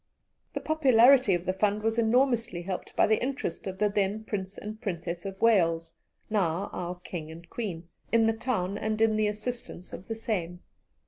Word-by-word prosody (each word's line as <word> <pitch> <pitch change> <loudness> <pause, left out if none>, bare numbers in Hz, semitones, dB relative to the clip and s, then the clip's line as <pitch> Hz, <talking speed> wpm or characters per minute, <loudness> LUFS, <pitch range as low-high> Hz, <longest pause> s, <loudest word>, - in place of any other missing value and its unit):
The - - -2
popularity 260 - +5
of 175 0 -4
the 185 - +1
fund 205 +2 +1
was 225 +1 +1
enormously 230 -5 +2
helped 185 0 -5
by - - +5
the 220 - +2
interest 255 -10 -3
of 190 0 -4
the 210 - +3
then 205 +1 0
Prince 195 -3 -4
and 215 +2 -7
Princess 175 -2 -4
of 195 0 -7
Wales, 165 -7 +3 0.3
now 195 -2 0
our 180 0 -3
King 160 -4 -6
and 165 +1 -11
Queen, 180 -8 -4 0.2
in 230 -1 +4
the 225 - +3
town 220 -5 -2
and 215 0 -1
in 225 -1 +4
the 215 0 +2
assistance 210 -3 -5
of 185 - -8
the 225 - -3
same. 180 -6 -3
210 Hz, 185 wpm, -28 LUFS, 180-225 Hz, 0.3 s, popularity